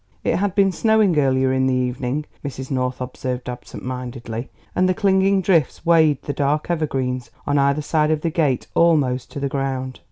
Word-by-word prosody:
It -, -, +1 dB
had 200 Hz, -1 st, -1 dB
been 195 Hz, -1 st, +4 dB
snowing 210 Hz, -3 st, +3 dB
earlier 130 Hz, -1 st, +2 dB
in 130 Hz, 0 st, +2 dB
the 130 Hz, -, +2 dB
evening, 125 Hz, +3 st, -2 dB, 0.2 s
Mrs. 135 Hz, -2 st, -6 dB
North 130 Hz, -1 st, -1 dB
observed 125 Hz, 0 st, -4 dB
absent 125 Hz, 0 st, -8 dB
mindedly, 125 Hz, -2 st, -5 dB, 0.3 s
and 185 Hz, +1 st, +3 dB
the 185 Hz, -, +1 dB
clinging 195 Hz, -2 st, +3 dB
drifts 165 Hz, -4 st, +1 dB
weighed 160 Hz, -4 st, +4 dB
the 145 Hz, -, -3 dB
dark 150 Hz, +4 st, 0 dB
evergreens 130 Hz, -6 st, -2 dB, 0.2 s
on 145 Hz, 0 st, +1 dB
either 140 Hz, +2 st, +2 dB
side 150 Hz, 0 st, +1 dB
of 155 Hz, -1 st, +1 dB
the 165 Hz, -, -1 dB
gate 145 Hz, -6 st, +1 dB
almost 140 Hz, -7 st, +2 dB
to -, -, -6 dB
the 140 Hz, -, -1 dB
ground. 135 Hz, -2 st, -3 dB
140 Hz, 185 wpm, -21 LUFS, 130-165 Hz, 0.3 s, been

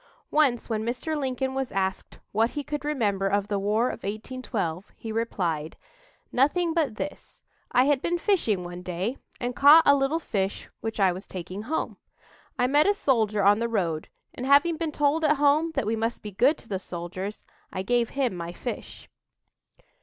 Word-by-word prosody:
Once 275 Hz, -6 st, +2 dB
when 220 Hz, -2 st, -1 dB
Mr. 250 Hz, +7 st, -2 dB
Lincoln 265 Hz, -2 st, -2 dB
was 265 Hz, -1 st, -2 dB
asked 190 Hz, -1 st, -2 dB
what 225 Hz, +3 st, +2 dB
he 290 Hz, +2 st, -4 dB
could 295 Hz, 0 st, -4 dB
remember 210 Hz, -10 st, 0 dB
of 200 Hz, +1 st, 0 dB
the 200 Hz, -1 st, 0 dB
War 215 Hz, +5 st, +1 dB
of -, -, -6 dB
1812, 205 Hz, -4 st, -4 dB
he 225 Hz, -, -7 dB
replied: 175 Hz, -9 st, -2 dB, 0.5 s
"Nothing 325 Hz, +6 st, +2 dB
but 315 Hz, -9 st, 0 dB
this: 295 Hz, -, -7 dB, 0.3 s
I 250 Hz, -, +5 dB
had 285 Hz, -2 st, +2 dB
been 350 Hz, -, 0 dB
fishing 325 Hz, -, +1 dB
one 175 Hz, 0 st, -7 dB
day 185 Hz, +8 st, -3 dB, 0.2 s
and 245 Hz, 0 st, -3 dB
caught 295 Hz, +4 st, +8 dB
a 285 Hz, -, +7 dB
little 275 Hz, +3 st, +1 dB
fish 195 Hz, -11 st, -2 dB
which 225 Hz, -1 st, -4 dB
I 190 Hz, -2 st, +5 dB
was 185 Hz, +2 st, -7 dB
taking 185 Hz, +2 st, -6 dB
home. 295 Hz, +9 st, -3 dB, 0.6 s
I 250 Hz, -, +3 dB
met 290 Hz, +6 st, +4 dB
a 405 Hz, -, +4 dB
soldier 220 Hz, -, +1 dB
on 205 Hz, +2 st, +5 dB
the 235 Hz, 0 st, -1 dB
road, 170 Hz, -8 st, -1 dB, 0.2 s
and, 255 Hz, -, -5 dB
having 290 Hz, +5 st, +5 dB
been 320 Hz, -1 st, -2 dB
told 295 Hz, +2 st, +1 dB
at 300 Hz, 0 st, +4 dB
home 295 Hz, +3 st, +3 dB
that -, -, 0 dB
we 220 Hz, +2 st, 0 dB
must 225 Hz, +1 st, -2 dB
be 210 Hz, -, -6 dB
good 250 Hz, -, +3 dB
to -, -, -15 dB
the 195 Hz, -3 st, -2 dB
soldiers, 185 Hz, +3 st, -6 dB, 0.3 s
I 185 Hz, -, -3 dB
gave 240 Hz, +2 st, +1 dB
him 265 Hz, -6 st, 0 dB
my 170 Hz, 0 st, -5 dB
fish." 240 Hz, +7 st, -7 dB
230 Hz, 185 wpm, -26 LUFS, 195-285 Hz, 0.6 s, caught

